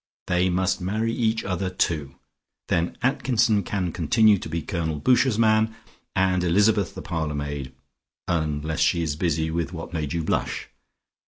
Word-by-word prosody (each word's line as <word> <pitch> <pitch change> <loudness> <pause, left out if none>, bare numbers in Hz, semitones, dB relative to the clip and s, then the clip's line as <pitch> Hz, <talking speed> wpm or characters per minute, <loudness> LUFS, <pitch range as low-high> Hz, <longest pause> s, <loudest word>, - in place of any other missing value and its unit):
They 90 +1 +2
must 95 +1 0
marry 110 +5 -1
each 110 -1 0
other 95 0 -2
too. 75 -6 -1 0.5
Then 85 +1 0
Atkinson 120 -4 +2
can 90 -2 -2
continue 105 +5 +4
to - - -7
be 85 0 -3
Colonel 80 -5 -2
Boucher's 125 - +3
man 110 0 +3 0.4
and 95 -1 +2
Elizabeth 100 +3 +2
the - - -7
parlour 80 -3 -2
maid, 70 -2 -4 0.6
unless 80 -2 -1
she 85 -1 +2
is 75 -3 -1
busy 80 -1 0
with 85 +1 -2
what 80 0 -7
made 75 -4 -2
you 85 -1 -1
blush. - - -2
90 Hz, 155 wpm, -24 LUFS, 80-105 Hz, 0.6 s, continue